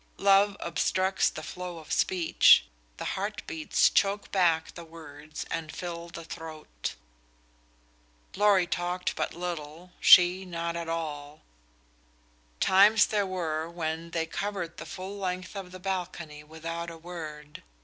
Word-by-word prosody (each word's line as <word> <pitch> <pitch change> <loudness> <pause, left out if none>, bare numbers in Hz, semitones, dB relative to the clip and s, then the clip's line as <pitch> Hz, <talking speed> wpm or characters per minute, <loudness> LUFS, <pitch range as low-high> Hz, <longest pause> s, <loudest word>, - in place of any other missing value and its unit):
Love 200 0 +4
obstructs 185 +4 +1
the 155 - -8
flow 180 0 -6
of 160 -2 -11
speech; 175 -3 +5 0.3
the - - -5
heart 205 +2 -4
beats 160 -1 +2
choke 200 +1 +1
back 165 -4 +2
the 170 - -9
words 155 -2 -9
and 160 -1 -3
fill 170 -1 -6
the 170 0 -8
throat. 155 - -7 1.4
Lorry 200 -2 +4
talked 180 +1 -2
but - - -2
little, 170 0 -6
she 180 +1 +7
not 170 -2 -4
at 170 -1 -4
all. 150 -3 -5 1.2
Times 205 +3 +6
there 205 -2 0
were 165 -3 -2
when; 165 -1 -4
they 165 -1 -1
covered 180 -1 -4
the - - -8
full 195 +2 -7
length 185 -1 -4
of 190 -2 -6
the 185 - -8
balcony 175 -5 -4
without 165 +2 -6
a 165 - -9
word. 155 -3 -8
170 Hz, 135 wpm, -28 LUFS, 160-185 Hz, 1.4 s, she